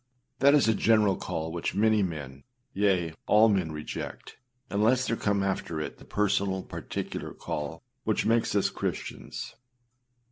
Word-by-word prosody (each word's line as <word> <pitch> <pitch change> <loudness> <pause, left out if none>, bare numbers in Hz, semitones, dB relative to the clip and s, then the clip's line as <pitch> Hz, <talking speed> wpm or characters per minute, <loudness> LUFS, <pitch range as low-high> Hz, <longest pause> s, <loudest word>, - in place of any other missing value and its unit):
â 125 0 -47
That 140 +2 +6
is 145 - +4
a 110 - +5
general 105 -3 +4
call 80 -2 -4
which 85 0 -3
many 110 0 +4
men, 70 -7 -4 0.3
yea, 95 -5 +2
all 110 +2 +6
men 95 -6 +1
reject, 75 0 -6 0.3
unless 115 +6 +3
there 115 - 0
come 100 -3 0
after 95 -4 -2
it 75 - -5
the - - -14
personal, 100 -2 0
particular - - -5
call, 75 - -5 0.2
which 110 - 0
makes 115 -1 +2
us 100 - +2
Christians. - - -5
100 Hz, 150 wpm, -28 LUFS, 85-110 Hz, 0.3 s, That